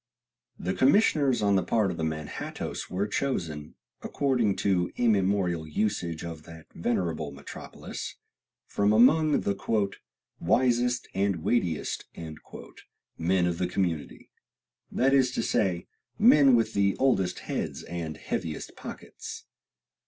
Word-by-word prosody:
The 90 +2 -2
commissioners 140 - +3
on 100 -1 +3
the 95 - +3
part 105 -2 +1
of 85 - -6
the 80 - -3
Manhattoes 75 -2 -4
were 95 +3 -1
chosen, 85 - -3 0.3
according 125 -8 +1
to 90 -3 +1
immemorial 95 -7 +1
usage 85 -2 -2
of 80 -2 -7
that 80 -1 -12
venerable 85 -6 -1
metropolis, 70 0 -8 0.5
from 100 +1 +1
among 150 +7 +5
the 100 0 -1 0.4
"wisest 125 -1 +2
and 95 -4 0
weightiest" 90 -10 0 1.1
men 90 +2 +2
of 85 -1 -1
the 90 - +1
community; 90 -4 -3 0.6
that 135 +2 +2
is 130 -2 +4
to - - -1
say, 90 -4 0 0.3
men 150 - +7
with 115 -1 +1
the 100 -1 +2
oldest 95 -9 +1
heads - - -4
and 85 -2 -5
heaviest 80 -3 -4
pockets. - - -9
100 Hz, 120 wpm, -28 LUFS, 85-120 Hz, 1.1 s, men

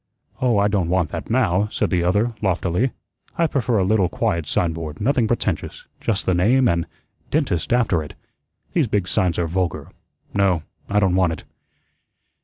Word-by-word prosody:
"Oh, 125 -4 +3
I 100 0 +4
don't 100 -5 0
want 90 -3 +1
that - - -5
now," 105 -5 +2
said - - -1
the 90 -2 +2
other 105 +7 +1
loftily. 95 +4 +1 0.5
"I 170 - +3
prefer 125 -7 0
a 95 - +3
little 95 -2 +2
quiet 85 -2 -1
signboard, 80 -3 -2
nothing 125 0 +2
pretentious 110 -7 -2
just 105 -2 -1
the 95 - +2
name, 120 +9 +3
and 85 -3 +1 0.4
'Dentist' 130 - 0
after 115 -9 +2
it. 75 - -9 0.6
These 160 -7 +2
big 100 -4 0
signs 90 -2 +1
are 85 - +1
vulgar. 90 +1 -2 0.4
No, 95 -5 +2 0.3
I 105 - +2
don't 95 -3 +2
want 90 -3 +2
it." 80 - -9
95 Hz, 170 wpm, -22 LUFS, 85-115 Hz, 0.6 s, I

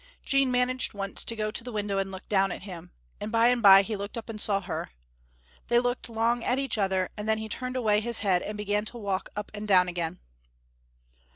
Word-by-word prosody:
Jean 275 -2 +3
managed 250 -1 0
once 195 -1 -1
to 230 - -2
go 215 -1 -2
to 230 - -4
the 245 - -7
window 205 -2 -1
and 195 0 -2
look 190 0 -9
down 195 -2 +2
at - - -6
him, 180 -4 -9 0.3
and 210 - -5
by 230 +1 +4
and 245 -1 +1
by 195 -2 +9
he 215 +2 -3
looked 200 +3 -6
up 230 - -7
and 215 -2 -5
saw 200 -2 +1
her. 175 -4 -5 0.8
They 240 - +3
looked 245 0 0
long 230 +1 0
at 250 - +1
each 270 -5 -1
other, 190 -2 0
and 210 0 -5
then 220 - +3
he 220 0 -5
turned 255 +3 -4
away 215 -4 +2
his 235 +1 +2
head 185 -2 +3
and 210 0 -5
began 210 0 0
to 240 - -7
walk 200 -4 -3
up 210 0 -5
and 210 0 -6
down 185 -3 +5
again. 175 -2 -3
210 Hz, 230 wpm, -27 LUFS, 195-235 Hz, 0.8 s, by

